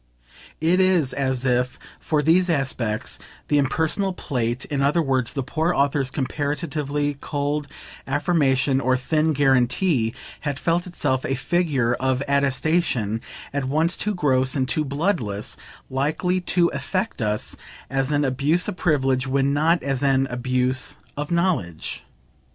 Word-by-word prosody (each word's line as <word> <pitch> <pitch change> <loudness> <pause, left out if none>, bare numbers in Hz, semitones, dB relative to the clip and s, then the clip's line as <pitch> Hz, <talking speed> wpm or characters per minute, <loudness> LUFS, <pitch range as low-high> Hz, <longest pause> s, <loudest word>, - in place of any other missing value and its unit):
It 170 +4 +3
is 180 -8 +3
as 130 -1 -1
if, 125 0 +1 0.2
for 150 -2 0
these 180 +4 +4
aspects, 130 -8 -1 0.3
the 145 - +4
impersonal 160 +7 0
plate 125 -6 -2
in 140 -2 -2
other 145 +5 +3
words 130 -6 0
the 135 - -2
poor 160 +6 0
author's 140 -1 +1
comparatively 145 +1 -2
cold 145 0 -2 0.4
affirmation 135 -2 +2
or 130 0 +2
thin 155 +4 +1
guarantee 135 -2 +2 0.2
had 145 -3 -3
felt 170 +4 0
itself 130 -7 -1
a 135 - -1
figure 140 -4 +1
of 130 +1 0
attestation 140 -5 +1 0.3
at 140 -1 -1
once 155 +6 +1
too 210 0 -1
gross 130 -5 +2
and 130 -2 +1
too 155 - +1
bloodless, 140 - -1 0.3
likely 155 +7 0
to 175 -1 +2
affect 185 - -3
us 105 -1 -1 0.3
as 135 +1 -1
an 145 0 +2
abuse 145 +7 +1
of - - -4
privilege 135 -6 +1
when 135 +1 +1
not 160 +4 +2
as 135 -2 -1
an 135 -1 +3
abuse 125 +1 0 0.2
of 145 0 -4
knowledge. 170 - -1
140 Hz, 140 wpm, -23 LUFS, 130-160 Hz, 0.4 s, these